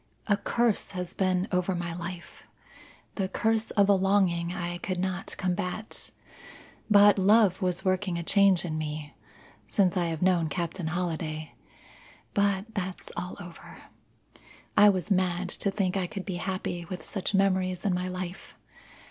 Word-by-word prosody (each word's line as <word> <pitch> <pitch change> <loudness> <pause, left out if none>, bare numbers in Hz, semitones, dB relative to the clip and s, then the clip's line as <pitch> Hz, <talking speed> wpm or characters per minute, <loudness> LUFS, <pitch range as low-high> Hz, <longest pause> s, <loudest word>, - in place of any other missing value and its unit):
A 205 - +3
curse 230 0 0
has 180 0 -4
been 185 0 +1
over 180 0 +1
my 175 -1 -3
life 175 0 -8 0.7
the 190 - -1
curse 220 +1 0
of 200 -2 +3
a 200 - +6
longing 190 -3 +2
I 175 -1 -4
could 185 -1 -3
not 185 0 -3
combat. 185 +3 -3 0.8
But 205 -1 +7
love 200 -1 +4
was 180 +1 -1
working 185 -1 0
a 170 - -3
change 195 -1 +4
in 155 -2 -3
me. 150 -1 -5 0.5
Since 185 - +2
I 175 -1 +1
have 165 0 -2
known 175 -4 +3
Captain 170 +2 -3
Holliday 160 -2 -3 0.8
but 200 +2 +1
that's 190 -3 -5
all 180 +1 -5
over. 175 -1 -11 1.0
I 205 0 +8
was 190 +1 -1
mad 185 -1 +1
to 200 - +1
think 195 -2 -1
I 190 -2 0
could 195 0 -6
be 185 -3 -3
happy 185 -1 -3
with 180 +1 -7
such 195 0 -2
memories 185 -1 +1
in 195 - +2
my 180 +1 -1
life. 185 0 -6
185 Hz, 155 wpm, -28 LUFS, 175-195 Hz, 1.0 s, I